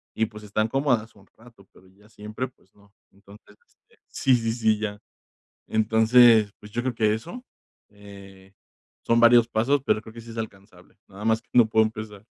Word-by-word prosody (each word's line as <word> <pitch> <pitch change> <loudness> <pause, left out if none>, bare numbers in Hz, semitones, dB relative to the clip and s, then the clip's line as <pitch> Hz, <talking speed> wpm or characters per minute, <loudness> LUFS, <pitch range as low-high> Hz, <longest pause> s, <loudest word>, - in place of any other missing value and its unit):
y, 110 - +1
pues, 105 -1 -13
están 105 +1 -1
cómodas 125 -4 -1
un 100 -1 -21
rato, 115 -4 -19
pero 95 - -21
ya 100 +3 -24
siempre, 105 +4 -7
pues, 95 -6 -33
no. 100 0 -25 0.2
Entonces 100 +1 -19
este - - -33
Sí, 130 -2 +1
sí, 115 -2 -2
sí, 110 -2 +1
ya. 105 -1 -5 0.7
Entonces, 110 0 +4
pues, 105 - -14
yo 120 - -2
creo 130 -1 -3
que 110 -1 +1
eso, 170 - -9 0.5
eh, 100 -2 -15 0.5
son 115 - +2
varios 120 0 +5
pasos, 125 +5 0
pero 110 - +1
creo 110 - -14
que 115 - -10
sí 115 - -13
es 115 - -10
alcanzable. 100 -4 -10
Nada 100 +2 -11
más 110 0 +1
que - - -40
no 120 -2 +6
puedo 110 0 +3
empezar. 110 -2 -9
110 Hz, 190 wpm, -24 LUFS, 105-115 Hz, 0.7 s, no